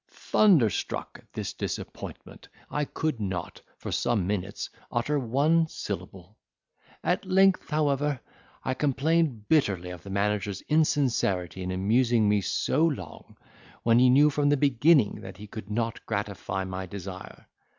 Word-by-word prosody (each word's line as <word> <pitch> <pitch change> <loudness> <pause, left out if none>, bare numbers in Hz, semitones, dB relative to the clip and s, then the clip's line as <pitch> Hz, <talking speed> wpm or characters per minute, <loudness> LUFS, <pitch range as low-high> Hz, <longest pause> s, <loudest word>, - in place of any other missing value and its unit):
"Thunderstruck 160 - +2
at - - -33
this - - -4
disappointment, - - -7 0.2
I 150 0 0
could 155 -3 -2
not, 95 -4 -4 0.2
for - - -6
some 120 -6 +1
minutes, 100 0 -3 0.2
utter 140 +5 0
one 145 +7 +2
syllable. 100 - -7 0.6
At 180 +2 +1
length, 190 0 +3
however, 145 -2 +1 0.5
I 130 - 0
complained 140 -4 0
bitterly 95 - +1
of 90 -2 -9
the 100 - -11
manager's 100 0 -1
insincerity 125 - +1
in 90 - -3
amusing 110 +4 +2
me 105 0 +3
so 145 - 0
long, 95 - -3 0.5
when 115 0 +5
he 125 0 +6
knew 145 +4 +6
from 145 0 +1
the 145 - +3
beginning 140 -2 +3
that 95 -1 -9
he 105 - -9
could 105 -1 -9
not 115 +1 -2
gratify 95 0 -3
my 95 0 -5
desire. 95 0 -8
115 Hz, 140 wpm, -27 LUFS, 100-150 Hz, 0.6 s, he